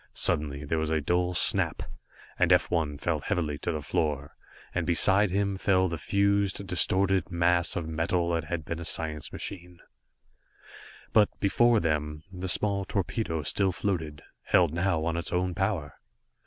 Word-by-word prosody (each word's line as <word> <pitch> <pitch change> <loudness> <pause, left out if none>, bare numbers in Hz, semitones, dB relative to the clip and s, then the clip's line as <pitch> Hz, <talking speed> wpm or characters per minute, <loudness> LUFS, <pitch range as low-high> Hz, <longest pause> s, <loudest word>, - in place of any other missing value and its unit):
Suddenly, 75 -1 -1
there 80 +3 -1
was 80 -1 -2
a 80 0 +1
dull 90 +4 0
snap, 75 - +3 0.6
and - - +3
F - - +3
1 80 -4 0
fell 80 +1 -1
heavily 75 -1 -2
to - - -2
the 75 -2 -3
floor, 75 -1 -2 0.4
and 85 -1 -2
beside 95 +4 +3
him 100 +1 -1
fell 95 -2 +2
the 85 -2 -4
fused, 100 +2 +1
distorted 95 0 +2
mass 85 0 +2
of 85 -2 -3
metal 85 +2 -1
that 85 -1 -1
had 80 -1 -4
been 85 - -4
a - - -6
science 80 -2 -1
machine. 90 -2 -7 1.4
But 105 -2 +5
before 115 +3 +3
them, 75 -3 -2
the 90 0 -5
small 100 +1 +1
torpedo 90 -4 -2
still 95 +4 +1
floated, 80 -6 -3 0.2
held 85 -4 +3
now 85 -2 0
on 85 0 -1
its 85 - -4
own 90 0 0
power! 95 -6 -2
85 Hz, 160 wpm, -28 LUFS, 80-95 Hz, 1.4 s, But